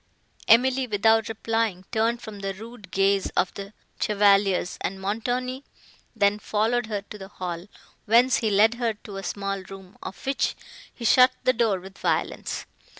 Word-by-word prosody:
Emily, 255 +2 +4
without 220 +1 +3
replying, 225 -4 -1
turned 230 +2 0
from 215 -2 -8
the 195 -1 -4
rude 220 -1 -11
gaze 195 +1 +2
of 185 - +2
the 200 0 -8 0.3
chevaliers, 200 -3 +2
and 190 +1 -3
Montoni 245 +6 -2 0.5
then 205 -1 +2
followed 220 +3 0
her 205 -2 -3
to 210 +1 -11
the 190 - -8
hall, 180 -2 -6 0.4
whence 235 +4 +5
he 220 - 0
led 210 +3 +4
her 230 -2 0
to 205 -1 -10
a 195 - -6
small 195 0 -3
room, 195 0 -12
of - - -9
which 270 0 0 0.4
he 235 - -8
shut 250 +3 +6
the 255 - +4
door 225 -5 +1
with 190 +2 -13
violence. - - -2
210 Hz, 160 wpm, -25 LUFS, 195-230 Hz, 0.5 s, shut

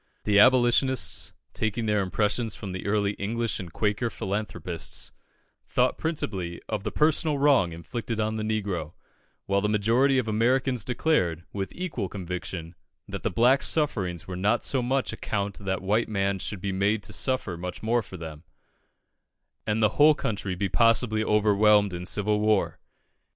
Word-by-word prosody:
The 105 -1 +4
Abolitionists, 130 +2 +3 0.2
taking 110 +1 -2
their 105 -1 +2
impressions 105 +4 0
from 100 -4 -7
the 95 +2 -5
early 100 0 +1
English 115 +3 -2
and 90 -4 -7
Quaker 105 +5 0
philanthropists, 95 -5 -4 0.6
thought - - +1
principally 95 - -3
of 105 -3 -3
the - - -3
personal 155 0 +2
wrong 135 -11 +4
inflicted 110 +7 -5
on 110 0 0
the 110 - -3
negro; 100 -7 -2 0.5
while 100 0 +1
the 105 - 0
majority 115 +6 +3
of 125 -3 0
Americans 125 +2 +1
declared, 120 - 0
with 95 -1 -3
equal 180 - -3
conviction, 90 -3 -5 0.3
that - - -6
the - - 0
black's 125 +4 +3
sufferings 95 - -1
were 95 - -5
not 100 +3 +1
of - - -10
so 130 - 0
much 130 +2 0
account 100 -1 -3
that 95 -2 -3
white 105 +4 +1
men 100 -2 0
should 95 0 -4
be 100 - -2
made 100 +3 +1
to - - -9
suffer 130 -9 -1
much 90 +4 -7
more 120 +2 +2
for 95 -3 -10
them, 80 -2 -8 1.2
and 110 +1 +1
the 105 - +5
whole 150 +1 +7
country 100 -7 -3
be 100 +2 -1
possibly 115 0 +3
overwhelmed 105 -1 +4
in 90 +1 -5
civil 105 +1 0
war. 105 -1 +1
105 Hz, 160 wpm, -26 LUFS, 95-120 Hz, 1.2 s, whole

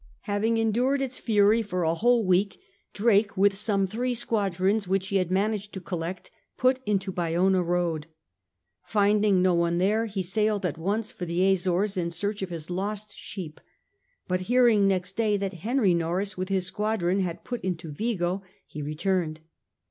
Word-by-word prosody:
Having 215 +2 0
endured 240 +5 +1
its 265 -1 -3
fury 215 0 +3
for 185 -5 -2
a 160 0 +2
whole 235 +4 +2
week 185 +2 +1 0.3
Drake, 205 -1 +2
with 200 +1 +4
some 200 -1 +1
three 245 +6 -2
squadrons 200 -3 0
which 190 0 0
he 200 - +2
had 185 -2 0
managed 205 +2 -1
to 190 - -5
collect^ 175 0 -5 0.3
put 255 +1 +3
into 195 -2 0
Bayona 180 +2 +1
road. 170 -3 -1 0.8
Finding 205 -2 +3
no 185 -1 +4
one 170 0 +1
there, 210 +5 +1
he 195 -3 -3
sailed 210 +2 0
at 165 -2 -2
once 205 +6 -2
for 180 - -6
the 180 +3 +2
Azores 190 +2 0
in 170 -2 0
search 200 +5 -3
of 190 - -3
his 170 -1 -6
lost 205 +3 -4
sheep; 170 -6 -8 0.7
but 185 0 0
hearing 240 -5 +5
next 190 -1 -1
day 215 -2 +1
that 195 -1 -3
Henry 225 -4 +2
Norreys 175 +4 -1
with 185 +1 -4
his 190 -2 0
squadron 200 -2 0
had 175 -3 -3
put 245 -1 -5
into 175 -3 -4
Vigo 185 0 -1 0.2
he 150 - -8
re 150 +1 -4
turned. 170 -3 -1
195 Hz, 170 wpm, -26 LUFS, 180-215 Hz, 0.8 s, hearing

